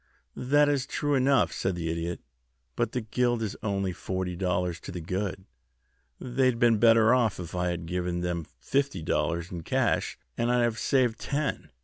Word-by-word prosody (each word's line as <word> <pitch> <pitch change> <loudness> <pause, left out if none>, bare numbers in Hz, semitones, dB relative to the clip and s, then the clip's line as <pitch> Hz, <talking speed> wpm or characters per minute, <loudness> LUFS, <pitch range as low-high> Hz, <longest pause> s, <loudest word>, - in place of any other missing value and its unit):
"That 145 +3 +3
is 140 -2 0
true 145 -1 -1
enough," 135 0 +3
said 95 -1 -1
the 85 -1 -3
Idiot; 85 +1 -3 0.5
"but - - -1
the 125 - -1
guild 120 +1 0
is 105 - -3
only 100 -3 -1
forty 95 0 -3
dollars 90 -2 -1
to - - -8
the 90 - -5
good. 95 +2 -3 0.7
They'd 130 0 +1
have 115 - -8
been 115 -2 +4
better 115 0 +6
off 120 -7 +2
if 85 -2 -7
I 90 0 0
had 85 -1 -3
given 90 0 -2
them 85 -2 -2
fifty 140 - -1
dollars 85 +3 -1
in 85 -2 -5
cash, - - 0 0.2
and 120 +1 +2
I'd 125 -1 +3
have 115 -1 0
saved 125 -4 +2
ten." 145 0 -2
100 Hz, 185 wpm, -28 LUFS, 90-125 Hz, 0.7 s, better